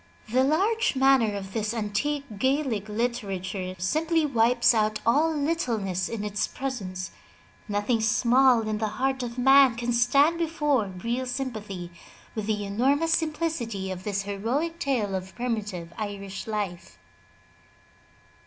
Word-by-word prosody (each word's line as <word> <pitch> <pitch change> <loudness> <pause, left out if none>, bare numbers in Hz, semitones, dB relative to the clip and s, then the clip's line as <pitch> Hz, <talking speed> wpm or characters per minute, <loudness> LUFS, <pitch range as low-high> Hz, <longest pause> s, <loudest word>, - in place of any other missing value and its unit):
The 255 +2 +4
large 395 - +2
manner 265 -5 +4
of 195 -1 -6
this 215 +1 -2
antique 235 +7 -1
Gaelic 260 -6 0
literature 200 -5 -3
simply 315 - +1
wipes 240 -2 +3
out 215 -1 +1
all 295 +8 +3
littleness 240 - -1
in 225 -3 -4
its 210 0 -1
presence. 190 -9 -5 0.6
Nothing 205 +3 0
small 240 +2 +4
in 215 -1 -1
the 220 - 0
heart 265 0 0
of 240 0 -5
man 270 -1 +6
can 240 +1 -2
stand 280 +8 +3
before 295 -8 +1
real 230 +8 -3
sympathy 215 -9 -5 0.4
with 215 -2 -4
the 210 -2 -1
enormous 275 +11 +1
simplicity 300 - -1
of 185 0 -6
this 200 -1 -2
heroic 245 +12 -2
tale 235 -8 0
of 190 0 -5
primitive 210 -8 -3
Irish 200 -1 -5
life. 195 - -4
230 Hz, 130 wpm, -26 LUFS, 205-270 Hz, 0.6 s, man